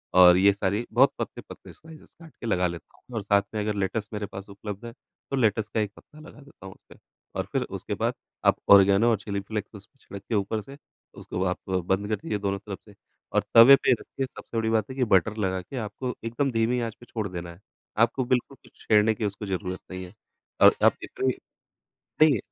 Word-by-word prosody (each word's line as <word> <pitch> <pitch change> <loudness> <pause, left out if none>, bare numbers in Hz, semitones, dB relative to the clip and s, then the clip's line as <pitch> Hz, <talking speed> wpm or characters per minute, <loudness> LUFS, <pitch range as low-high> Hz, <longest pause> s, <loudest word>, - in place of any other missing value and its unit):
और 90 -1 +8
ये 100 +1 +5
सारी 100 +4 -1
बहुत 130 +4 +5
पतले-पतले - - -8
स्लाइसेज़ 160 -1 -16
काट 160 -2 -14
के - - -6
लगा 90 -4 +2
लेता 85 -2 -9
हूँ 125 - -13
और 110 - -1
साथ 100 0 +3
में 105 - -1
अगर 105 0 -1
लेटस 100 +2 -2
मेरे 105 -1 -3
पास 100 0 -9
उपलब्ध 100 +2 -8
है 115 - -6 0.4
तो - - +1
लेटस 110 -3 +1
का 110 - +1
एक 105 -2 -1
पत्ता 155 - -17
लगा 155 - -13
देता 140 -8 -16
हूँ 95 - -9
उसमें। - - -20 0.4
और - - -2
फिर - - 0 0.2
उसके - - -5
बाद - - +1 0.3
आप - - +4 0.2
ऑरिगेनो 100 +4 +6
और 110 - +2
चिली 100 -1 -4
फ्लेक्स 105 +1 -6
उसपे 105 +7 -15
छिड़क 100 -1 -10
के 115 - 0
ऊपर 105 +2 -1
से 135 +6 -12 0.4
उसको 90 - -3
आप 90 - -1
बंद 95 +2 0
कर 110 - +1
दीजिए 105 +1 -4
दोनों 100 -1 -2
तरफ 100 -1 -8
से 105 - -16 0.4
और - - +2
तवे 120 +4 +10
पे - - +1
रखिए 130 +2 -2
सबसे 120 -2 -9
बड़ी 110 0 0
बात 110 -1 +1
है 130 - -7
कि 130 - +1
बटर 100 +4 +3
लगा 95 -3 -1
के 130 +9 -9
आपको 115 +3 -4
एकदम 130 +4 -1
धीमी 115 +2 +1
आँच 115 -2 -3
पे 120 - -14
छोड़ 110 -4 -4
देना 85 -2 -7
है। 85 - -19 0.5
आपको 130 +3 -3
बिल्कुल 130 +1 -1
कुछ - - -19 0.2
छेड़ने 110 0 +4
की 105 - -3
उसको 100 +1 -4
ज़रूरत 95 -1 -3
नहीं 95 0 -6
है 90 - -14 0.5
और - - +8
आप - - +5
इतने 130 - -3 1.0
नहीं, 145 -8 +6
105 Hz, 225 wpm, -26 LUFS, 100-120 Hz, 1.0 s, तवे